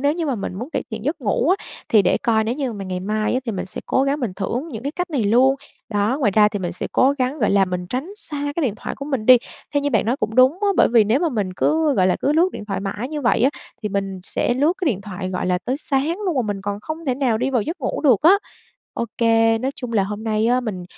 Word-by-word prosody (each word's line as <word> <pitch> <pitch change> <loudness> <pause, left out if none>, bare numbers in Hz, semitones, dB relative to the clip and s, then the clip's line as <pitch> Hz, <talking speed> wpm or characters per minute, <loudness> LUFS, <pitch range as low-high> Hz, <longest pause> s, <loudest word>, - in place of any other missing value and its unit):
nếu 285 +2 +2
như 335 -1 -3
mà 275 - 0
mình 195 -4 -5
muốn 240 - -6
cải - - -2
thiện 220 -1 -6
giấc 300 +3 -2
ngủ 240 +4 0
á, - - -14 0.2
thì 215 -3 +5
để - - +2
coi 220 -2 +1
nếu 230 +2 -1
như 265 -3 -2
mà 200 -2 -6
ngày 185 -1 -4
mai 215 +4 -1
á, 255 - +1
thì 230 - -3
mình 195 - -4
sẽ 190 - -7
cố 265 - +2
gắng 280 +2 0
mình 235 -7 -2
thưởng 240 - -3
những 230 -7 -7
cái 280 +2 -3
cách 360 +1 -3
này 280 -7 0
luôn. 250 +6 +4 0.3
Đó, 210 +3 0
ngoài 225 -7 +3
ra 210 -1 +6
thì 210 - -4
mình 180 -2 -3
sẽ 175 - -4
cố 270 +2 +4
gắng, 260 +4 -1
gọi - - +2
là, 195 -1 +4
mình 180 -1 -4
tránh 260 - -4
xa 290 -7 -3
cái 335 - 0
điện 235 -7 0
thoại - - -5
của 275 - -6
mình 270 -7 -3
đi, 255 - +9 0.4
theo 285 - +3
như 285 - 0
bạn 225 -4 +1
nói 240 +4 +1
cũng 215 -4 -3
đúng 255 +2 +6
á, 410 - +3
bởi - - +5
vì 230 -2 +5
nếu 225 +7 +2
mà 345 - +2
mình 210 -9 -2
cứ, 310 -2 +2
gọi 185 -5 +3
là, 185 - +2
cứ 285 - +2
lướt 335 +4 +4
điện - - -7
thoại 200 -2 -3
mãi 205 +5 -4
như 300 0 -4
vậy 240 -3 +2
á, 265 - +5 0.3
thì 210 - -1
mình 195 -2 -3
sẽ 240 - -1
lướt 290 +6 +3
cái 370 - -2
điện 220 -10 +1
thoại, 190 -2 -6
gọi 180 -1 -2
là, 180 0 +1
tới 255 +2 -1
sáng 285 +2 0
luôn, 350 -5 0
mà 255 - +2
mình 205 -3 -3
còn 205 0 -3
không 315 +8 -6
thể 260 -4 0
nào 250 -4 +1
đi 255 +3 0
vào 245 -5 +1
giấc 330 - -5
ngủ 260 - -2
được 260 -9 +4
á. 335 +4 +7 0.6
Ô - - -1
kê, 225 -1 +3
nói 260 +4 -1
chung 250 -2 -6
là 210 -3 +3
hôm 210 +2 -5
nay 220 0 +1
á, 250 +2 +3
mình 205 -7 -5
235 Hz, 305 wpm, -21 LUFS, 205-280 Hz, 0.6 s, đi